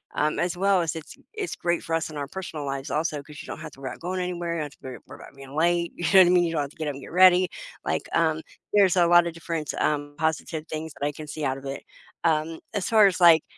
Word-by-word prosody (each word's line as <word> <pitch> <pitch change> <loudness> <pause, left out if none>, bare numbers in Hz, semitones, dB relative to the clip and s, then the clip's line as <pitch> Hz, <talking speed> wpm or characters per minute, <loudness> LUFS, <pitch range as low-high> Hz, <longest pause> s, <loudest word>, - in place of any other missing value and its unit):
um, 150 +1 +1
as 175 0 -1
well 195 -1 +3
as 165 -1 -2
it's 160 - -10 0.2
it's 425 -4 -4
great 170 0 0
for 165 -1 -2
us 160 -1 -1
in 150 - -8
our 140 -1 -3
personal 160 -4 -6
lives 135 0 -4
also, 150 -2 -1
'cause 150 0 -11
you - - -11
don't - - -7
have - - -7
to - - -17
worry 130 - -4
about - - -11
going 185 +2 -3
anywhere, 175 -1 -3
you 165 - -2
don't - - -2
have 145 - -9
to - - -23
worry 130 -2 -7
worry - - -10
about - - -13
being 135 0 -11
late, 170 +1 +1
you 175 - -7
know 190 - +9
what 185 - +8
I - - +3
mean? 180 -1 +5
You 170 - 0
don't 160 -3 0
have 140 - -3
to - - -20
get 155 -2 -3
up - - -3
and 140 - -9
get - - -11
ready. 185 0 +7 0.4
Like, - - 0
um, 160 -1 +2 0.3
there's 195 -3 +5
a 175 -1 +5
lot 175 0 +6
of 170 - -4
different, 165 -2 -4
um, 145 -1 -1
positive 160 0 -2
things 155 0 -5
that 140 - -1
I 145 - -3
can 155 - -8
see 150 0 -4
out 135 0 0
of 135 - -11
it. 135 0 -5 0.4
Um, 160 0 +1
as 200 -4 -2
far 220 -2 +6
as, 190 -2 -1
like 165 -3 +7
160 Hz, 300 wpm, -25 LUFS, 150-175 Hz, 0.4 s, know